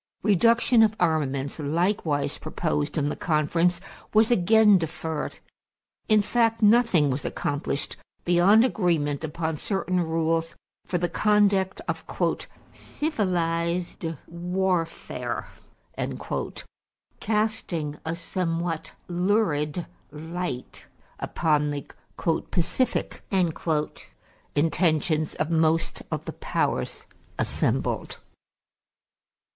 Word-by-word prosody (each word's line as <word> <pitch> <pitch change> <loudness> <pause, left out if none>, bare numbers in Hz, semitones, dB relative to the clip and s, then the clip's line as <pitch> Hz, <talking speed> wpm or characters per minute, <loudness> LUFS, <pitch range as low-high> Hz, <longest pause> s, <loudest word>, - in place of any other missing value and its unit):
Reduction 230 +4 +4
of 220 -1 +4
armaments, 145 -4 0
likewise 155 -2 0
proposed 155 -1 -2
in 145 -1 +1
the - - -3
conference, 165 +2 +1 0.4
was 220 +2 +5
again 210 0 +6
deferred. 160 -1 -4 0.7
In 215 -2 +5
fact, 225 0 +1
nothing 205 - +5
was 130 +2 -2
accomplished 145 0 -2 0.3
beyond 185 +7 +5
agreement 165 - 0
upon 160 0 -2
certain 190 -2 -1
rules 165 0 0 0.3
for 180 - 0
the 175 0 0
conduct 200 -1 +2
of - - -2 0.7
"civilized 175 - -1 0.2
warfare," 175 0 -2 1.7
casting 210 -9 -1
a 160 +1 -2
somewhat 165 -2 -2
lurid 175 -4 +1 0.2
light 160 -3 -5 0.3
upon 150 -2 +1
the 145 -1 -4 0.6
"pacific" 215 +9 0 1.3
intentions 155 0 +2
of 155 +2 -1
most 160 0 +2
of - - -3
the - - -5
powers - - -2 0.3
assembled. - - -1
170 Hz, 85 wpm, -26 LUFS, 155-195 Hz, 1.7 s, again